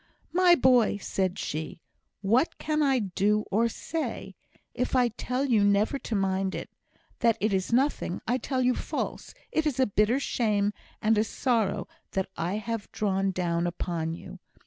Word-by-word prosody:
"My 360 Hz, 0 st, +6 dB
boy!" 250 Hz, -6 st, +4 dB
said 190 Hz, -1 st, -1 dB
she, 155 Hz, +2 st, -4 dB, 0.4 s
"what 235 Hz, -, +2 dB
can 305 Hz, 0 st, -1 dB
I 275 Hz, -3 st, +3 dB
do 210 Hz, 0 st, +1 dB
or 230 Hz, +4 st, +3 dB
say? 320 Hz, +7 st, -4 dB, 0.4 s
If 250 Hz, -, -1 dB
I 250 Hz, -2 st, +4 dB
tell 250 Hz, +4 st, -2 dB
you 230 Hz, -6 st, +3 dB
never 205 Hz, +7 st, +2 dB
to 230 Hz, -, -4 dB
mind 190 Hz, -1 st, 0 dB
it -, -, -6 dB, 0.5 s
that 230 Hz, -1 st, +3 dB
it 210 Hz, 0 st, +1 dB
is 190 Hz, +2 st, 0 dB
nothing 255 Hz, -7 st, +1 dB
I 245 Hz, +3 st, +1 dB
tell 260 Hz, -1 st, -1 dB
you 250 Hz, 0 st, +3 dB
false. -, -, -4 dB, 0.2 s
It 315 Hz, -1 st, +1 dB
is 270 Hz, -3 st, -2 dB
a 260 Hz, -, +5 dB
bitter 210 Hz, +4 st, +2 dB
shame 210 Hz, -6 st, +1 dB, 0.3 s
and 215 Hz, 0 st, +4 dB
a -, -, +4 dB
sorrow 225 Hz, -3 st, 0 dB, 0.3 s
that 190 Hz, -1 st, 0 dB
I 175 Hz, +4 st, -2 dB
have 225 Hz, 0 st, -4 dB
drawn 195 Hz, -2 st, 0 dB
down 175 Hz, -2 st, 0 dB
upon 165 Hz, -2 st, -3 dB
you. -, -, -10 dB
215 Hz, 170 wpm, -28 LUFS, 195-255 Hz, 0.5 s, My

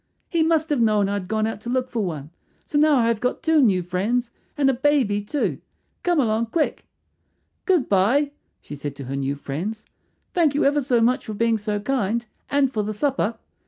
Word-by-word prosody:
"He 335 Hz, -2 st, +1 dB
must 320 Hz, -1 st, +2 dB
have 280 Hz, -5 st, +2 dB
known 210 Hz, -3 st, +3 dB
I 200 Hz, -, -1 dB
had 200 Hz, -3 st, -3 dB
gone 215 Hz, +1 st, 0 dB
out 220 Hz, -1 st, -4 dB
to 235 Hz, -, -6 dB
look 255 Hz, 0 st, 0 dB
for 230 Hz, -3 st, -1 dB
one. 155 Hz, -5 st, -5 dB, 0.3 s
So 290 Hz, -, 0 dB
now 305 Hz, 0 st, +5 dB
I 235 Hz, -3 st, +3 dB
have 230 Hz, -2 st, +1 dB
got 250 Hz, -, -2 dB
two 320 Hz, -2 st, +4 dB
new 195 Hz, -8 st, +3 dB
friends 220 Hz, +8 st, -1 dB, 0.3 s
and 280 Hz, -2 st, +3 dB
a 270 Hz, -, +4 dB
baby 255 Hz, -6 st, +2 dB
too. 275 Hz, +8 st, -2 dB, 0.4 s
Come 350 Hz, -3 st, +2 dB
along, 230 Hz, -2 st, +1 dB
quick." 310 Hz, +7 st, -1 dB, 0.8 s
"Good 355 Hz, -9 st, +3 dB
bye," 235 Hz, +10 st, +3 dB, 0.3 s
she -, -, -9 dB
said 145 Hz, 0 st, -6 dB
to 140 Hz, -, -8 dB
her 135 Hz, +1 st, -5 dB
new 140 Hz, 0 st, -1 dB
friends. 170 Hz, +11 st, -5 dB, 0.5 s
"Thank 320 Hz, -5 st, +2 dB
you 290 Hz, -, +2 dB
ever 290 Hz, +1 st, +3 dB
so 250 Hz, -3 st, +2 dB
much 245 Hz, +3 st, +1 dB
for 215 Hz, -, -4 dB
being 230 Hz, +1 st, +1 dB
so 210 Hz, 0 st, -2 dB
kind, 235 Hz, -1 st, -1 dB, 0.2 s
and 275 Hz, -2 st, +2 dB
for 215 Hz, -, 0 dB
the 210 Hz, +1 st, -3 dB
supper. 245 Hz, -2 st, 0 dB
230 Hz, 210 wpm, -23 LUFS, 205-280 Hz, 0.8 s, now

